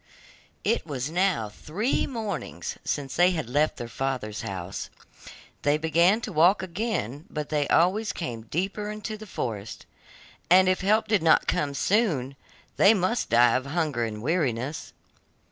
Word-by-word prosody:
It - - +1
was 145 -2 -4
now 180 - +1
three 175 - -2
mornings 205 - -4
since 140 -2 -3
they 175 +1 +5
had 160 -7 -3
left 145 +5 +1
their 120 - -5
father's 120 -3 -3
house. 95 0 -5 0.7
They 145 +1 +2
began 170 +7 +3
to - - -5
walk 175 +6 +4
again, 170 - -3
but 150 -1 -5
they 150 -2 0
always 195 +6 +2
came 120 -9 -5
deeper 195 - -2
into 215 +1 -5
the 215 0 -10
forest, 110 - -5 0.6
and 185 +1 +6
if 185 0 +2
help 215 +3 +2
did 210 -4 +2
not 160 -1 +4
come 140 -1 -1
soon, 150 - +1 0.4
they 210 +3 +6
must 195 +5 0
die 120 0 +5
of 130 +1 -1
hunger 150 -5 -1
and 105 -1 -4
weariness. 140 -3 -1
155 Hz, 150 wpm, -26 LUFS, 125-190 Hz, 0.7 s, and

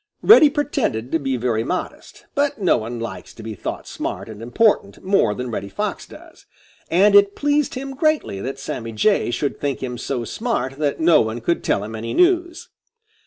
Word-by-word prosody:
Reddy 365 -9 +8
pretended 270 - -2
to 165 - +1
be 135 -3 -1
very 115 -2 0
modest; 180 +9 -5
but 285 -2 0
no 190 - +3
one 115 +1 -5
likes 115 - -7
to 115 - -11
be 110 0 -5
thought 100 - -6
smart - - -5
and 110 -1 -9
important 200 - +1
more 185 - +2
than 125 +1 -5
Reddy 100 -2 -4
Fox 100 - -4
does, - - -15 0.4
and 195 +5 +4
it 200 0 +6
pleased 290 -1 0
him 270 +1 -5
greatly 295 - 0
that 135 +4 -4
Sammy 115 -4 -5
Jay 200 - +2
should 135 +4 -2
think 140 -2 -2
him 125 -2 -4
so 125 -3 -3
smart 135 - -3
that 145 -2 -1
no 165 0 +5
one 110 +1 -2
could 170 +9 -1
tell 100 - 0
him 110 +2 -7
any 115 +1 -5
news. 350 -2 +2
140 Hz, 190 wpm, -21 LUFS, -, 0.4 s, Reddy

